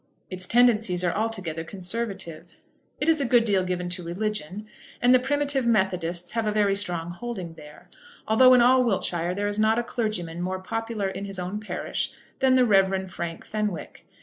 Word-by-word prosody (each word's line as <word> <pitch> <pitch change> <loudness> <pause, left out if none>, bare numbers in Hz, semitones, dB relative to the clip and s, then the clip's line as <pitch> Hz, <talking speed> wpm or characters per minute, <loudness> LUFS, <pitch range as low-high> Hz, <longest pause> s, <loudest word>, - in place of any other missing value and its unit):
Its 185 0 -3
tendencies 225 -7 +4
are 175 - +1
altogether 190 -8 -2
conservative. 190 -2 -5 0.4
It 295 - -1
is 320 -2 +3
a - - +2
good 240 -2 +3
deal 195 -4 +2
given 180 -1 -2
to 180 0 -5
religion; 200 +1 -4 0.3
and 245 +1 +5
the 255 - +6
Primitive 280 -1 0
Methodists 180 -5 0
have 225 -1 -1
a - - +2
very 205 -2 +2
strong 175 -4 -3
holding 185 -3 -6
there, 150 -2 -14 0.4
although 255 +4 +6
in 245 - +5
all 255 +1 +5
Wiltshire 180 -5 0
there 205 +1 -1
is 205 +1 -2
not 220 +1 +3
a 240 - +1
clergyman 205 -9 -3
more 185 +1 -2
popular 225 +1 -3
in 195 +1 -5
his 195 -1 -5
own 185 +3 -4
parish 215 - -4 0.3
than 260 -1 +4
the 255 -1 +5
Rev. 190 -3 +2
Frank 170 -2 -6
Fenwick. 210 -6 -4
200 Hz, 180 wpm, -25 LUFS, 180-230 Hz, 0.4 s, the